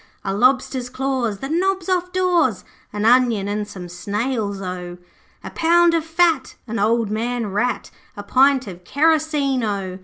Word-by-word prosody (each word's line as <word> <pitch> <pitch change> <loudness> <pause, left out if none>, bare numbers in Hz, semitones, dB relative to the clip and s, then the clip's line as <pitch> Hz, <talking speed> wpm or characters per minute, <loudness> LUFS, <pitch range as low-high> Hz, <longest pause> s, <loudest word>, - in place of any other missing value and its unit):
A 195 - -1
lobster's 255 +2 +1
claws, 255 -5 -2
the 270 - -3
knobs 370 +3 0
off 365 -1 0
doors, 355 - +1 0.3
An 210 +1 -3
onion 235 -4 +3
and 205 0 -2
some 185 -3 -9
snails 205 +3 -3
O! 180 -2 -6 0.5
'A - - -6
pound 340 +1 +3
of 330 -2 +1
fat, 325 -3 +1
an 230 -2 -4
old 220 +1 +1
man 235 +2 -2
rat, 240 +6 -1 0.3
A - - -6
pint 270 0 +3
of 180 -3 -10
kerosene 295 - +1
O! 195 -3 -3
250 Hz, 155 wpm, -21 LUFS, 205-310 Hz, 0.5 s, onion